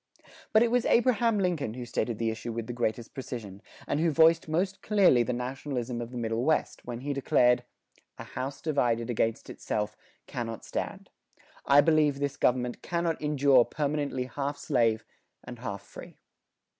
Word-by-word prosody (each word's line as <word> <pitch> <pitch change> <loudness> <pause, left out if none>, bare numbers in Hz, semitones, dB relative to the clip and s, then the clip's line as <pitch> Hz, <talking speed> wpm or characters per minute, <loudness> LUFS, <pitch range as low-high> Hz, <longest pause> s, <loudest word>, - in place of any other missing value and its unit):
But 220 +1 +6
it 235 - +1
was 245 -1 +3
Abraham 235 -2 +3
Lincoln 170 - -1
who 125 -1 -6
stated 115 -1 -2
the 115 0 0
issue 115 +1 -5
with 115 0 -4
the 120 - -5
greatest 120 -1 -2
precision, 110 -7 -7 0.2
and 145 - -1
who 165 +1 +3
voiced 160 +2 +4
most 185 +5 -1
clearly 195 - +4
the 120 - 0
nationalism 125 -1 -3
of 120 - -5
the 125 - -7
Middle 115 0 -1
West, 155 +2 0
when 120 0 -5
he 145 +2 -2
declared, 125 -2 +3 0.5
"A - - -7
house 135 +2 -6
divided 120 -6 +1
against 115 -1 -1
itself 105 0 -3 0.3
cannot 115 -3 -5
stand. - - -5 0.6
I 140 +1 +7
believe 150 -2 +3
this 140 0 -2
government 125 -1 0
cannot 170 -2 -1
endure 140 -4 +4
permanently 145 -2 -2
half 140 +2 -4
slave 115 -6 +1 0.4
and 125 -1 -9
half 100 -5 -5
free." - - -12
130 Hz, 165 wpm, -28 LUFS, 120-155 Hz, 0.6 s, I